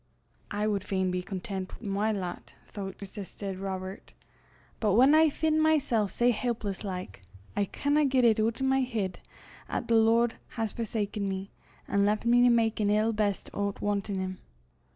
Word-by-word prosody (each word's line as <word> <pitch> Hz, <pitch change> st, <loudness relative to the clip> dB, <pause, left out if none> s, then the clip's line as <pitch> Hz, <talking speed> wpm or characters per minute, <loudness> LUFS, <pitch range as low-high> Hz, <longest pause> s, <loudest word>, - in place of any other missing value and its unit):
"I 205 Hz, +1 st, -1 dB
wad 205 Hz, -3 st, 0 dB
fain 190 Hz, -2 st, 0 dB
be 180 Hz, 0 st, -1 dB
contentit 190 Hz, 0 st, -5 dB
wi' 220 Hz, -, -8 dB
my 205 Hz, +2 st, +1 dB
lot, 185 Hz, -4 st, -5 dB, 0.2 s
thouch," 195 Hz, -2 st, -5 dB
persisted 195 Hz, -1 st, -7 dB
Robert; 190 Hz, 0 st, -6 dB, 0.7 s
"but 210 Hz, -3 st, +2 dB
whan 260 Hz, +5 st, +6 dB
I 315 Hz, 0 st, +6 dB
fin' 315 Hz, +1 st, +1 dB
mysel' 290 Hz, -9 st, +3 dB
sae 240 Hz, +5 st, +2 dB
helpless 220 Hz, -4 st, -2 dB
like, 180 Hz, -, -6 dB, 0.3 s
I 205 Hz, -, +2 dB
canna 290 Hz, +8 st, +1 dB
get 260 Hz, -2 st, +3 dB
it 220 Hz, -2 st, +4 dB
oot 225 Hz, +4 st, 0 dB
o' -, -, +2 dB
my 265 Hz, 0 st, +3 dB
heid 220 Hz, -7 st, -2 dB, 0.5 s
'at -, -, -3 dB
the 230 Hz, -, +3 dB
Lord 230 Hz, +1 st, +3 dB, 0.2 s
has 225 Hz, -2 st, -1 dB
forsaken 210 Hz, -3 st, -2 dB
me, 190 Hz, +1 st, -4 dB, 0.4 s
an' 200 Hz, 0 st, +2 dB
left 210 Hz, +2 st, +1 dB
me 240 Hz, +1 st, +5 dB
to 245 Hz, -, +6 dB
mak 230 Hz, -2 st, +2 dB
an 205 Hz, -1 st, +2 dB
ill 215 Hz, +2 st, +2 dB
best 210 Hz, -2 st, -1 dB
o' 200 Hz, 0 st, 0 dB
't -, -, -18 dB
wantin' 200 Hz, -1 st, -1 dB
him." 185 Hz, 0 st, -4 dB
210 Hz, 180 wpm, -29 LUFS, 195-235 Hz, 0.7 s, whan